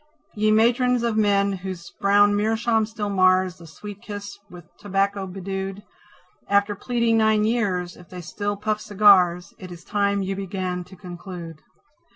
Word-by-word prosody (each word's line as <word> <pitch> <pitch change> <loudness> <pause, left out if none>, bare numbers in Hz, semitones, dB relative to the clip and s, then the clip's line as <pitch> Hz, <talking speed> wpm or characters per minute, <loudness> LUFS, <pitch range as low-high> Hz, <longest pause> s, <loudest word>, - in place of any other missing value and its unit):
Ye 215 -1 +1
Matrons 240 +2 +3
of 230 -2 0
men 200 -2 +2
whose 185 -2 -7
brown 205 +1 +4
meerschaum 220 +1 +1
still 215 -2 -4
mars 185 -1 +3
The 170 - -12
sweet 205 +5 -10
kiss 205 -1 -7
with 175 -2 -12
tobacco 195 0 -1
bedewed, 195 +1 -5 0.7
After 200 +1 +2
pleading 235 +1 0
nine 220 -1 +3
years, 195 -6 -1
if 180 -3 -16
they 180 -1 -8
still 205 +4 -4
puff 215 +1 -2
cigars, 195 -3 +4
It 185 -1 -9
is 175 0 -11
time 200 -1 0
you 195 +1 -3
began 185 -2 -4
to 190 - -14
conclude. 175 -3 -9
200 Hz, 155 wpm, -23 LUFS, 185-210 Hz, 0.7 s, brown